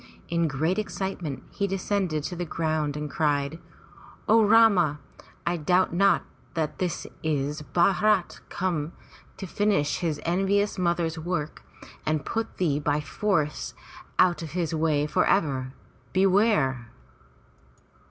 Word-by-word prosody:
In 170 -1 +1
great 160 +7 0
excitement 185 -9 -4
he 200 - -1
descended 190 -5 -1
to 180 - -4
the 175 - -3
ground 155 -3 -1
and 150 0 -3
cried: 145 0 0 0.7
0 225 0 +5
Rama, 200 -9 +5 0.5
I 175 0 0
doubt 180 +3 +2
not 195 +3 +3 0.3
that 155 -2 -2
this 180 -3 -2 0.2
is 150 -1 -1
Bharat 185 +4 +2
come 170 -4 -2 0.4
to 195 - -6
finish 195 -5 +1
his 160 -5 -1
envious 195 +4 +1
mother's 170 -2 0
work 160 -2 -3 0.4
and 155 -1 -1
put 225 0 -3
thee 150 -6 +1
by 145 0 0
force 150 +2 -1 0.4
out 180 -2 +4
of 160 -3 -7
his 170 -3 -1
way 155 -2 +1
for 150 - +1
ever! 135 -8 +1 0.4
Beware!' 185 - +3
170 Hz, 125 wpm, -26 LUFS, 150-190 Hz, 0.7 s, 0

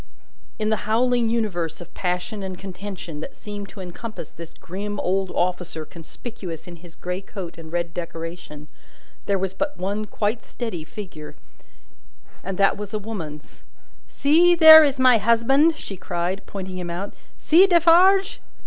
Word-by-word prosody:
In 215 -1 -1
the 215 -1 -2
howling 240 +1 +2
universe 175 -9 -2
of 175 - -12
passion 180 +4 -3
and 190 -1 -5
contention 185 -4 -7
that - - -8
seemed 205 -1 -8
to 200 - -10
encompass 185 0 -8
this 165 -1 -11
grim 205 +3 -6
old 190 +1 0
officer 180 -3 -2
conspicuous 170 +1 -9
in 175 -1 -10
his 170 0 -15
grey 180 +1 -4
coat 190 -3 -8
and 160 -1 -11
red 170 -1 -2
decoration, 165 -3 -7 0.6
there 200 - +2
was 190 0 -2
but 295 0 -3
one 200 +4 -2
quite 215 +2 -2
steady 225 -10 -5
figure, 160 -3 -9 1.1
and 190 0 -4
that 195 0 +3
was 210 +1 -6
a - - +1
woman's. 175 -9 -8 0.5
"See, 335 +5 +4
there 315 -1 +11
is 280 -2 +1
my 255 -3 +6
husband!" 270 +9 +3
she 195 - -7
cried, 180 +2 -3
pointing 190 -2 -6
him 175 -1 -5
out. 180 +4 -4 0.2
"See 355 +5 +5
Defarge!" 365 +3 +5
195 Hz, 155 wpm, -23 LUFS, 175-230 Hz, 1.1 s, there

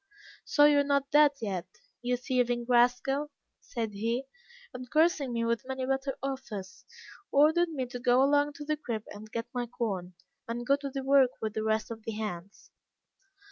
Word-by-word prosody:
"'So 290 - +5
you 295 -1 +6
are - - +4
not 280 -1 0
dead 295 0 +7
yet, 190 -5 -3 0.3
you 245 0 0
thieving 245 -2 0
rascal,' 250 +4 +2 0.3
said 225 -4 -4
he, 230 +5 -1 0.5
and 250 0 -8
cursing 310 -3 +2
me 230 -1 -1
with 230 0 0
many 265 -1 -3
bitter 270 +1 -1
oaths, 215 -9 -6 0.5
ordered 315 +5 +4
me 275 -5 -3
to 245 0 -7
go 250 +1 +4
along 290 +1 +3
to 295 0 -9
the 305 0 -1
crib 230 -7 -4
and 215 +1 -10
get 230 0 -3
my 245 -1 -2
corn, 195 -7 -4 0.3
and 235 +1 -4
go 275 - +4
to 280 0 -5
work 270 -1 +5
with 220 -1 -3
the 220 - -2
rest 220 +1 0
of 225 -1 -7
the 225 - -4
hands. 200 -3 -6
250 Hz, 180 wpm, -29 LUFS, 225-280 Hz, 0.5 s, dead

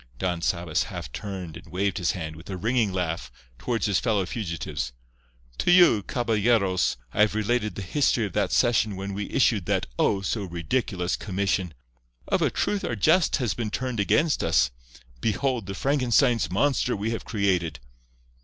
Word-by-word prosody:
Don 90 +1 -2
Sabas 85 -2 0
half - - -7
turned 95 - -6
and - - -14
waved 95 +1 -1
his 90 - +1
hand, 80 -3 -5
with 85 +4 -13
a 95 - -4
ringing 115 +1 +1
laugh, 85 -3 -3 0.3
toward 115 - -2
his 100 -4 +2
fellow 105 -5 +1
fugitives. 80 - -4 0.7
"To - - +1
you, 175 - +6
caballeros, 105 - +1 0.2
I - - +1
have 105 0 +4
related 110 0 0
the 100 - -5
history 115 +2 +1
of 100 - -6
that 100 -3 0
session 110 -4 +2
when 100 +1 -5
we 100 +1 -4
issued 110 -8 +2
that - - +1
O! 100 - +2
so 100 +2 -2
ridiculous 90 +1 -1
commission. 95 -4 -2 0.5
Of - - +1
a - - +3
truth 205 -1 -1
our 120 - -2
jest 155 - +3
has 125 -6 0
been 115 -3 -3
turned 125 +1 -3
against 145 +10 +2
us. 60 0 +3 0.5
Behold 120 - -1
the 95 - -5
Frankenstein's 125 -3 +2
monster 125 +4 +1
we 105 +2 -2
have 115 - -3
created!" 95 -7 0
100 Hz, 170 wpm, -26 LUFS, 90-120 Hz, 0.7 s, you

